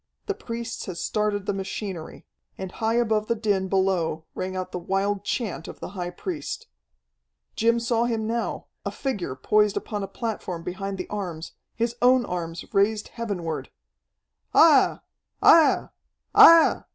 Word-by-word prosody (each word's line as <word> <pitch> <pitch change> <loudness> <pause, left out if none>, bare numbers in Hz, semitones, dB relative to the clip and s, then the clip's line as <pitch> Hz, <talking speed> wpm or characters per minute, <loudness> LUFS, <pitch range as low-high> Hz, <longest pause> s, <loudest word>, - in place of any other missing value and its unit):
The 410 - -1
priests 235 - -6
had 180 -3 -5
started 210 -1 -1
the - - 0
machinery. 190 -3 -6 0.3
And 190 -1 -6
high 225 +2 -1
above 220 -3 +1
the 235 - +1
din 205 -4 0
below 185 -5 0
rang 185 0 -4
out 185 0 -4
the 180 - -4
wild 195 +3 -1
chant 210 -10 -3
of - - -9
the - - -6
high 180 -2 -4
priest. 305 - -5 0.9
Jim 230 +1 +3
saw 235 0 +1
him 225 -2 -1
now, 230 +1 -2 0.2
a - - -2
figure 200 - -3
poised 210 +10 +2
upon 210 -2 -4
a 195 - -3
platform 190 -8 -4
behind 195 +3 -4
the 185 - -5
arms, 175 -6 -5 0.2
his 235 +1 -1
own 250 0 +5
arms 170 -2 -5
raised 210 +2 +2
heavenward. 190 -9 -4 0.9
"Aiah! 310 -5 +6 0.4
Aiah! 325 -2 +6 0.4
Aiah!" 330 -1 +8
205 Hz, 150 wpm, -25 LUFS, 185-230 Hz, 0.9 s, Aiah